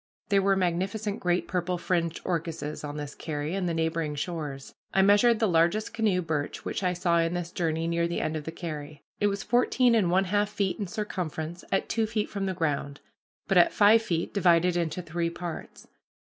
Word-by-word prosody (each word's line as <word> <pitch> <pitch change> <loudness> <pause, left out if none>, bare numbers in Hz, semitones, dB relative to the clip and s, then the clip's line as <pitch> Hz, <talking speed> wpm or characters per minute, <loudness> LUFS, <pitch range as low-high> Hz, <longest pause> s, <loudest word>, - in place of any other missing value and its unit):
There 200 -1 +4
were 195 0 +3
magnificent 195 +4 -1
great 180 -1 0
purple 180 0 -1
fringed 170 -1 -1
orchises 165 -3 -3
on 145 0 -5
this 145 -1 -5
carry 150 0 -4
and 190 -2 -1
the - - -1
neighboring 160 -2 -1
shores. 145 -3 -5 0.2
I 190 - +5
measured 205 +4 +5
the 220 - +2
largest 175 +6 +2
canoe 210 -5 +1
birch 150 -3 -3
which - - -3
I 180 -2 +1
saw 175 -1 +2
in 165 +1 +1
this 175 -1 -4
journey 165 -2 -1
near 170 0 +1
the 170 - -2
end 155 - -2
of 150 -1 -4
the 160 - -4
carry. 155 -4 -7 0.2
It 205 - +3
was 200 0 -2
fourteen 245 0 +3
and 210 -6 +3
one 185 +2 +3
half 205 +2 +1
feet 200 -1 -1
in 200 - -2
circumference 175 -5 -4
at 195 - +1
two 225 -1 0
feet 215 -1 -2
from 195 -1 -2
the 190 - -2
ground, 145 -3 -2 0.5
but 190 -3 +5
at 175 - +5
five 215 +2 +6
feet 170 -6 -2
divided 180 -2 +3
into 170 0 -1
three 170 0 -2
parts. 170 -1 -7
175 Hz, 200 wpm, -27 LUFS, 165-200 Hz, 0.5 s, five